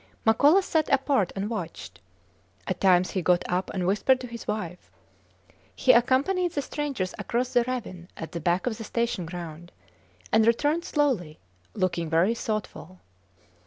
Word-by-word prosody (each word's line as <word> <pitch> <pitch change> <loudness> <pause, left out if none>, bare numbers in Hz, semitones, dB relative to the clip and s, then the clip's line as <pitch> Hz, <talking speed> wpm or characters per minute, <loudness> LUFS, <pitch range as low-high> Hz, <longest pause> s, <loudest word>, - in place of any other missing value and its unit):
Makola 290 - +5
sat 320 -4 0
apart 270 -7 +2
and 195 +1 -2
watched. 220 -1 -6 0.6
At - - -3
times 185 -1 +4
he 185 - -1
got 175 +1 +2
up 180 +1 -1
and 185 -2 -2
whispered 210 +7 +3
to - - -6
his 235 -1 -9
wife. 180 - -4 0.9
He 260 - +5
accompanied 275 +9 +2
the 285 - -1
strangers 275 -11 -3
across 240 +5 -2
the 245 - +4
ravine 210 -9 -5
at 160 - -7
the 170 - -4
back 175 +3 0
of 235 -3 -2
the - - -5
station 235 -6 -2
ground, 175 -1 -8 0.6
and 220 0 +4
returned 295 +8 +2
slowly 240 - 0 0.4
looking 170 -4 -1
very 170 +7 +3
thoughtful. 215 -5 -5
215 Hz, 155 wpm, -26 LUFS, 180-255 Hz, 0.9 s, Makola